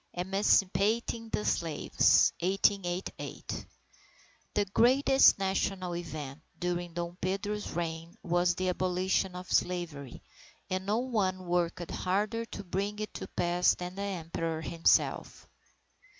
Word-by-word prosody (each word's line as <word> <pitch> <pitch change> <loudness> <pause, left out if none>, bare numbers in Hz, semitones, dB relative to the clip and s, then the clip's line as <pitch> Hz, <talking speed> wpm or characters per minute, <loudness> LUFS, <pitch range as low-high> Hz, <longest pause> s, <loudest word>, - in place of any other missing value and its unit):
III 175 - -1
Emancipating 205 +4 +1
the 210 - -2
Slaves 165 -3 +3
1888 190 0 -1 0.9
The 205 - +2
greatest 260 +7 +5
national 190 -2 -1
event 155 -4 -6 0.2
during 175 -1 -3
Dom 170 0 -4
Pedro's 205 +3 -2
reign 165 0 -4
was 175 0 +2
the 185 +1 -1
Abolition 185 +1 0
of 180 0 -8
Slavery, 165 -7 -1 0.5
and 185 +1 -2
no 210 +2 +2
one 200 -7 -1
worked 175 -1 -1
harder 210 +5 -1
to 200 - -8
bring 195 +3 -2
it 215 0 -5
to - - -6
pass 175 0 +2
than 180 0 -6
the 195 - -6
Emperor 165 -4 -3
himself. 165 +1 +1
185 Hz, 120 wpm, -30 LUFS, 175-200 Hz, 0.9 s, greatest